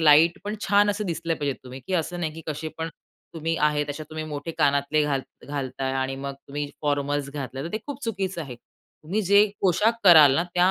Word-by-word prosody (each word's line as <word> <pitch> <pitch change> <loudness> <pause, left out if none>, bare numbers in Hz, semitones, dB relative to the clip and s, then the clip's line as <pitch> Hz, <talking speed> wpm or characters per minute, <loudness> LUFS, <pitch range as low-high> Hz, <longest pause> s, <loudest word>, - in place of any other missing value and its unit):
Light, 160 +2 +6
पण 205 +1 -3
छान 205 +1 +4
असे 205 +1 -2
दिसले 170 -2 -2
पाहिजेत 145 -4 -2
तुम्ही. 130 +1 -9
की 190 - -1
असं 175 +1 -1
नाही 160 -3 -2
की 165 - -9
कसे 155 +1 -3
पण 160 - -2 0.5
तुम्ही 165 0 -1
आहेत. 150 -1 +2
अशा 145 +2 -5
तुम्ही 155 0 -4
मोठे 150 +1 -5
कानातले 140 0 +3
घाल 140 -2 0 0.3
घालताय 135 -2 -3
आणि 135 0 -1
मग 140 0 -5
तुम्ही 145 +1 -5 0.2
फॉर्मल्स 145 -1 0
घातले. 135 -2 -5
तर - - -3
ते 215 - -1
खूप 285 -1 -6
चुकीचं 195 -5 -2
आहे. 140 -6 -6 0.5
तुम्ही 185 +8 -1
जे 200 +2 +6 0.2
पोशाख 200 +5 +3
कराल 155 -7 +9
ना, 170 - +2
त्या 180 +1 +4
155 Hz, 205 wpm, -25 LUFS, 140-175 Hz, 0.5 s, कराल